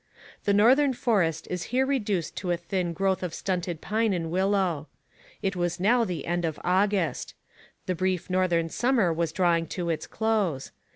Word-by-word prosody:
The 205 - +3
northern 260 +7 +5
forest 180 -11 0
is 180 -2 -3
here 260 +2 +2
reduced 210 - -1
to 185 - -3
a 175 - +1
thin 175 0 -2
growth 190 +3 0
of 180 -3 -4
stunted 175 -3 -3
pine 220 +1 0
and 165 -3 -3
willow. 185 -4 +1 0.6
It 195 0 0
was 175 0 -1
now 230 +5 +3
the 180 -6 -4
end 175 +1 -1
of 160 -2 -2
August. 185 -4 0 0.5
The 185 - 0
brief 185 0 -1
northern 180 -3 +1
summer 235 -4 +2
was 165 -1 -1
drawing 170 -2 +2
to 170 -2 -1
its 160 - -3
close. 205 -11 -1
185 Hz, 170 wpm, -27 LUFS, 170-205 Hz, 0.6 s, northern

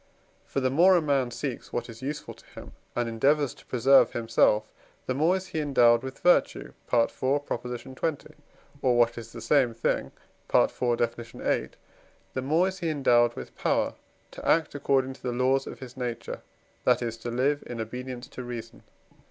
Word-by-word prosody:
For 135 - -2
the 130 0 +1
more 180 +7 +6
a - - +5
man 140 -5 +1
seeks - - -5
what - - -3
is 115 +1 -11
useful 140 +3 -5
to - - -20
him - - -10 0.2
and 120 -1 0
endeavours 140 +4 +2
to - - -19
preserve 135 +2 +5
himself, 115 -2 +2 0.4
the 130 - -1
more 160 +7 +3
is 190 0 -3
he 160 - -3
endowed 120 -6 +4
with 130 +1 -7
virtue 175 - +2 0.2
(IV. 115 -2 +3
xx.), 130 +2 -3 0.5
or, 125 -2 +3
what 120 0 +3
is 115 0 -10
the 115 - -9
same 120 0 +2
thing 115 - -1 0.4
(IV. 120 -1 +2
Def. 115 -1 +1
viii.), 115 0 -2 0.6
the 130 - -2
more 160 +7 +2
is 190 0 -5
he 170 -3 -1
endowed 120 -5 +3
with - - -9
power - - 0 0.4
to - - -10
act 160 -2 +2
according 135 -2 +1
to - - -18
the 125 - -2
laws 130 +2 +1
of - - -7
his 125 -2 -10
own 130 - -4
nature, 120 - -6 0.4
that - - +3
is 115 -1 -3
to 115 +1 -6
live 135 +5 +1
in 120 - -6
obedience 125 +2 -6
to - - -8
reason. 115 -2 -7
130 Hz, 185 wpm, -27 LUFS, 120-140 Hz, 0.6 s, more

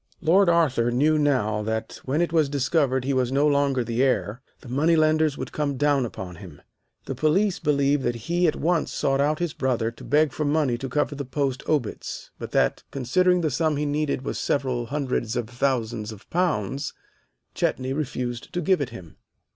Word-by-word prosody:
"Lord 175 +3 +4
Arthur 140 -9 +3
knew 150 +6 +2
now 125 -8 +1
that 110 +1 -3
when 150 +6 +1
it 170 - -3
was 155 -4 +3
discovered 135 -2 +1
he 140 - 0
was 130 -1 +1
no 140 +2 +3
longer 140 -3 +2
the 115 +1 -1
heir, 125 -3 0 0.2
the - - -13
money 150 +7 +2
lenders 155 -1 +3
would - - -5
come 145 -3 -2
down 145 -2 +2
upon 90 -5 -8
him. 85 -6 -11 0.5
The - - -3
police 175 - +1
believe 140 -1 +2
that 120 -2 -1
he 175 +1 +2
at 155 - +1
once 165 0 0
sought 135 0 +1
out 150 +2 +2
his 175 -2 -2
brother 120 -4 0
to 115 - -14
beg 150 +1 +2
for 155 - -2
money 145 -4 +1
to 135 - -5
cover 145 +2 0
the 140 0 -4
post 135 0 -2
obits, 145 -8 -2
but - - -6
that, - - +1
considering 180 +8 +2
the 155 -3 0
sum 155 +2 +1
he 150 - -1
needed 145 -2 -1
was - - -3
several 130 -4 -1
hundreds 130 -4 -2
of 120 -2 -2
thousands 120 -3 -1
of 110 0 -12
pounds, 145 - -1 0.6
Chetney 130 +1 -1
refused 125 -4 -4
to 180 - -1
give 185 -1 +2
it 140 - -2
him. 85 -4 -11
140 Hz, 195 wpm, -25 LUFS, 125-155 Hz, 0.6 s, Lord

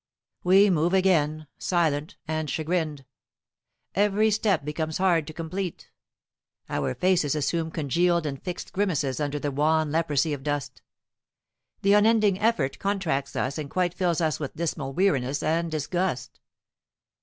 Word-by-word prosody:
We 195 +3 +6
move 170 +2 +2
again, 155 -5 +2
silent 160 -4 0
and 155 -1 -2
chagrined. 155 -4 -2 0.9
Every 210 +2 +3
step 200 -8 +1
becomes 155 +1 -2
hard 175 -5 +2
to 155 - -7
complete. 175 +3 -5 0.8
Our 65 - -1
faces 175 -6 +2
assume 160 +2 -1
congealed 170 +3 +1
and 140 -2 -4
fixed 180 -2 -6
grimaces 155 -10 0
under 145 -1 -1
the 145 0 -2
wan 155 +2 +1
leprosy 155 -1 +1
of 140 - -5
dust. 145 -1 -3 1.0
The 200 +1 +5
unending 210 -2 +4
effort 205 -12 +1
contracts 180 -9 -1
us 140 +4 -2
and 145 -2 -5
quite 180 0 0
fills 175 -2 0
us 155 -2 0
with 145 -3 -5
dismal 155 -4 -3
weariness 140 -6 +1
and 165 +2 0
disgust. 160 -2 -2
160 Hz, 135 wpm, -26 LUFS, 145-185 Hz, 1.0 s, We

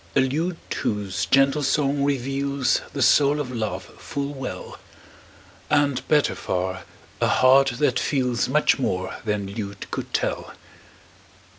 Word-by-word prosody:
A - - +5
lute 160 +7 0 0.2
whose 100 -3 -2
gentle 135 +2 +3
song 140 0 +1
reveals 140 0 0
The 140 - 0
soul 145 +3 +4
of 135 -4 -3
love 115 -3 -3 0.2
full 140 0 -4
well; 135 -2 -7 0.9
And, 145 -3 +1
better 150 -2 +3
far, 95 -1 -3 0.4
a - - +3
heart 135 0 +5
that 130 -3 +2
feels 125 -5 0
Much 150 +1 +3
more 95 -7 -2
than 105 -2 -1
lute 100 -2 -6
could - - -5
tell. - - -2
135 Hz, 130 wpm, -24 LUFS, 115-140 Hz, 0.9 s, A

